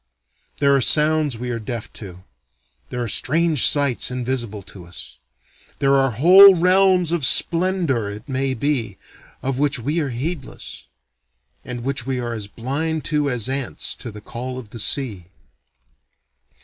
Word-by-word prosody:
There 140 -1 +3
are 135 - +2
sounds 150 -1 +3
we 125 +1 -5
are 115 - -3
deaf 110 -1 -6
to, 95 -3 -11 0.7
there 125 -1 -4
are - - -4
strange 155 +5 +3
sights 140 -4 +2
invisible 120 -5 -4
to 95 -1 -12
us. 85 - -10 0.6
There 140 0 +2
are 135 -1 +3
whole 185 - +8
realms 180 -1 +3
of 170 -4 -1
splendor, 165 - +2
it 105 +5 -9
may 135 -1 -2
be, 115 -6 -2 0.5
of 135 0 -2
which 145 -1 +1
we 145 +8 -2
are 145 -4 -2
heedless; 135 +4 -6 0.8
and 125 -1 -7
which 135 -1 -3
we 130 -1 -2
are 120 -1 -4
as 105 -3 -6
blind 145 +9 -4
to 150 -1 +1
as 125 -3 -1
ants 135 -1 -3
to 120 - -7
the 105 -1 -11
call 125 +3 -7
of 115 -5 -10
the 115 - -9
sea. 105 -7 -2
130 Hz, 155 wpm, -20 LUFS, 115-150 Hz, 0.8 s, whole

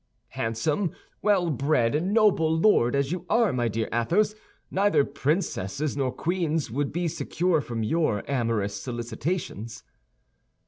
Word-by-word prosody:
"Handsome, 145 - -1 0.3
well 190 -5 +2
bred, 140 0 +1
noble 195 -5 +3
lord 160 - +4
as 140 +1 0
you 180 -1 -3
are, 230 -2 +3
my 120 -2 +1
dear 110 0 -2
Athos, 180 - +2 0.4
neither 195 -6 +3
princesses 140 - -1
nor 135 -3 0
queens 165 - -1
would 140 +3 -1
be 175 +2 -1
secure 170 0 0
from 115 -4 -4
your 110 -4 +1
amorous 115 -7 0
solicitations." 120 - -4
145 Hz, 125 wpm, -26 LUFS, 120-175 Hz, 0.4 s, lord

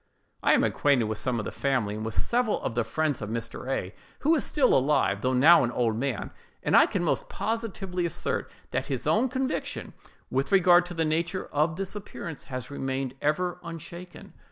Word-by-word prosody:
I - - +4
am - - +4
acquainted 140 -5 +2
with 110 -1 -2
some 125 -2 -1
of 105 - -3
the - - -4
family, 130 -7 0
and 110 +1 -5
with 110 0 -4
several 240 -2 +1
of - - -2
the 120 0 +1
friends 145 +5 -1
of 105 - -4
Mr. 115 +3 -5
A——, 95 -7 -2 0.3
who 310 +4 +4
is 310 - +2
still 275 -4 +3
alive, 140 +3 +2
though 130 0 +1
now 155 +6 +7
an 120 - +1
old 120 -2 0
man, 130 +2 -2 0.3
and - - +2
I - - +7
can - - -1
most - - 0
positively 195 -6 -2
assert 165 - -3 0.2
that - - -1
his 135 -4 -3
own 215 - +3
conviction, 265 +2 -3 0.4
with 135 +1 0
regard 175 -2 +6
to 175 - -7
the 165 -1 +1
nature 170 +4 -1
of 155 +2 +1
this 195 +2 -4
appearance, 170 -6 -7
has 130 -1 -6
remained 135 -2 -3
ever 175 +4 0
unshaken. 170 +2 -9
150 Hz, 200 wpm, -27 LUFS, 125-180 Hz, 0.4 s, now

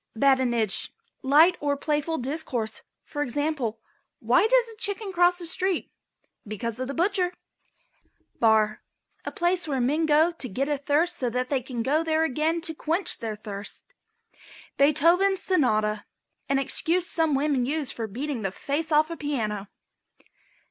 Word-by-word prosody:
BADINAGE. 240 -4 +2 0.3
Light 315 +7 +5
or 285 -1 0
playful 300 +2 -1
discourse. 250 -5 -3 0.2
For 290 - -5
example. 275 -4 -2 0.4
"Why 250 - +3
does - - +3
a - - -18
chicken 405 -2 -2
cross 355 0 +4
the 350 - -5
street? 370 +1 -1 0.6
Because 215 +2 -3
the 255 +1 -3
butcher." 360 +3 +1 1.1
BAR. 220 -2 +3 0.4
A - - -3
place 350 -1 0
where 275 -3 -1
men 295 +6 +1
go 310 +3 +4
to 305 -7 -5
get 265 +8 -2
a 295 -2 -1
thirst 310 +5 +1
so 250 -3 0
that 250 +2 -2
they 275 -3 0
can 245 -2 -4
go 300 +6 +1
there 320 0 +1
again 320 +3 0
to 320 0 -2
quench 330 +4 -1
their 220 -2 -4
thirst. 205 -1 -8 0.8
BEETHOVEN'S 335 +7 +4
SONATA. 215 - +1 0.4
An 275 - +2
excuse 335 +6 +1
some 320 -4 +1
women 275 -2 +1
use 290 +2 -1
for 225 -2 -4
beating 255 +4 -4
the 195 - -1
face 300 - -3
off 310 +2 +3
a - - -3
piano. 220 -10 -3
290 Hz, 150 wpm, -26 LUFS, 245-330 Hz, 1.1 s, Light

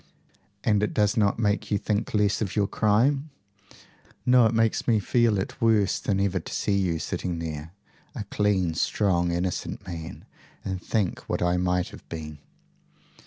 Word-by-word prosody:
"And 105 -2 +2
it 105 - -1
does 105 +2 +2
not 105 -4 +2
make 105 -2 0
you 105 - +2
think 105 +1 -1
less 105 0 +2
of 100 -3 -2
your 105 -2 +3
crime?" 125 +9 +2 1.0
"No. 125 -2 +6
It 110 - -1
makes 115 -1 +1
me 115 -3 +4
feel 115 +1 +2
it 95 +7 -4
worse 110 -4 +3
than 95 -2 0
ever 95 -1 +1
to - - -9
see 100 - 0
you 90 -4 +1
sitting 90 +1 -3
there, 80 -1 -5 0.4
a 115 - -3
clean, 100 -4 0
strong, 85 0 +1
innocent 90 +1 -3
man, 85 -2 -7 0.4
and 95 -1 -3
think 100 -1 -1
what - - 0
I 90 0 +2
might 90 0 0
have - - -14
been." 75 -2 -7
100 Hz, 165 wpm, -26 LUFS, 90-110 Hz, 1.0 s, No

